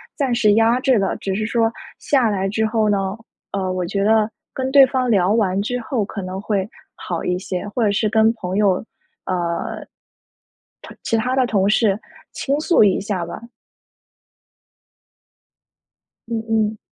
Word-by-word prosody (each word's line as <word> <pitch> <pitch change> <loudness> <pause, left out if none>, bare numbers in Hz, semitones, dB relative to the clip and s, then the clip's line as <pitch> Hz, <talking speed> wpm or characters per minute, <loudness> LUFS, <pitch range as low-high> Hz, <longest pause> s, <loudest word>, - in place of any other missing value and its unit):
暂 270 -4 0
时 215 -3 +4
压 225 +3 +3
制 260 -2 +3
的。 195 -2 0
只 195 -1 -3
是 215 +2 -1
说 225 0 +1 0.3
下 265 -5 +2
来 195 -1 -1
之 220 +2 0
后 220 -1 +1
呢， 195 -1 0 0.4
呃， 190 -2 -2
我 185 -1 -2
觉 195 +3 -1
得 215 0 +3 0.2
跟 260 0 -3
对 275 -1 +8
方 255 -1 0
聊 190 -2 +3
完 200 -4 +1
之 245 +4 -2
后 230 -1 -1
可 200 0 -6
能 185 +1 -5
会 200 -2 -1 0.3
好 170 -2 -5
一 180 - 0
些， 185 +1 -4
或 235 +3 -1
者 205 - +2
是 210 +2 +1
跟 220 +1 +3
朋 190 -4 -4
友 200 -3 +2 0.4
呃， 175 -2 -3 1.0
同 - - -12
其 - - 0
他 250 +3 0
的 260 -1 +3
同 200 -4 +1
事 210 -2 +2 0.3
倾 280 +1 -1
诉 315 -4 +4
一 200 -2 +3
下 195 -3 -3
吧。 - - -7 2.9
嗯 225 -1 -2
嗯。 220 -1 0
215 Hz, 175 characters per minute, -20 LUFS, 195-230 Hz, 2.9 s, 对